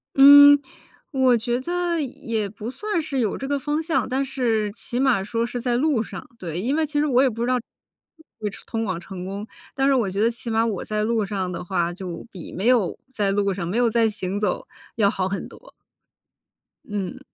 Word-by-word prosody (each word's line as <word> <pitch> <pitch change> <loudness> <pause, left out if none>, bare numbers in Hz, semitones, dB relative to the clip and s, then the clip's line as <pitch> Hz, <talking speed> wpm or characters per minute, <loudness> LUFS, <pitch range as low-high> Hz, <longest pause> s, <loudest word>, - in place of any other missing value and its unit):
嗯， 285 +1 +9 0.5
我 260 -3 +4
觉 240 +2 -1
得 345 +1 -1
也 225 -6 -3
不 215 +3 -7
算 415 +4 -2
是 275 -4 -3
有 215 -5 0
这 270 - -5
个 285 0 0
方 295 +3 -1
向， 330 -3 0
但 270 +2 0
是 225 -6 0
起 240 +3 -4
码 255 -8 +3
说 230 +3 -1
是 245 0 -4
在 240 -1 +1
路 280 -4 +2
上， - - -7
对， 170 -1 -4
因 255 +9 0
为 320 -1 +2
其 295 0 -1
实 300 - +2
我 260 -3 +3
也 270 - +4
不 230 +1 -6
知 - - 0
道 255 - +2 0.8
会 210 -1 -2 0.2
通 225 -1 -3
往 185 -5 -2
成 180 0 -8
功， 200 +3 -5 0.3
但 270 0 +2
是 275 - +4
我 230 -7 +1
觉 195 +2 -3
得 230 +2 +3
起 235 0 -6
码 225 +1 +2
我 210 -5 -2
在 215 0 -1
路 225 -2 +1
上 190 -3 -3
的 175 - -5
话 175 -1 -1
就 180 0 -7
比 180 -4 -9
没 190 +5 -4
有 235 -8 +3
在 205 -5 0
路 200 -1 +1
上， 175 -3 -4
没 205 +7 -2
有 240 -1 +3
在 225 0 +3
行 200 -1 -3
走 205 -4 -1 0.3
要 205 -3 +3
好 190 -1 -1
很 195 - -4
多。 - - -16 1.1
嗯。 200 -4 -4
230 Hz, 230 characters per minute, -23 LUFS, 200-270 Hz, 1.1 s, 嗯